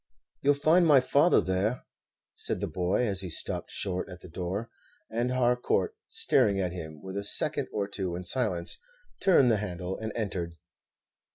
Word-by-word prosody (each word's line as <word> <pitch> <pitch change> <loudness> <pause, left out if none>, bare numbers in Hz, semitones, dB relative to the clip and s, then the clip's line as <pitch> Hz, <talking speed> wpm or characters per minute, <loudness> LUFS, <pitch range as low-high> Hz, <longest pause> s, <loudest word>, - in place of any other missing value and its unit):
"You 140 - +1
'll - - +7
find 160 +4 +4
my 145 -3 +7
father 145 +6 +4
there," 95 +6 -1 0.5
said - - 0
the - - -1
boy, 90 +6 0
as 100 -4 0
he 95 - -5
stopped 80 - -1
short 90 -2 -3
at 90 0 -10
the - - -11
door; 95 +7 -4 0.4
and 120 +2 0
Harcourt, 125 - +1
staring 130 - +3
at 90 -2 -1
him 80 -4 -8
for 95 0 -8
a 100 - -2
second 100 - +2
or 100 -2 -2
two 95 -3 -3
in 90 - -5
silence, 90 -4 0 0.4
turned 140 -10 +5
the 110 - +3
handle 95 -2 -4
and 110 0 -4
entered. 95 -6 -3
100 Hz, 175 wpm, -28 LUFS, 90-125 Hz, 0.5 s, ll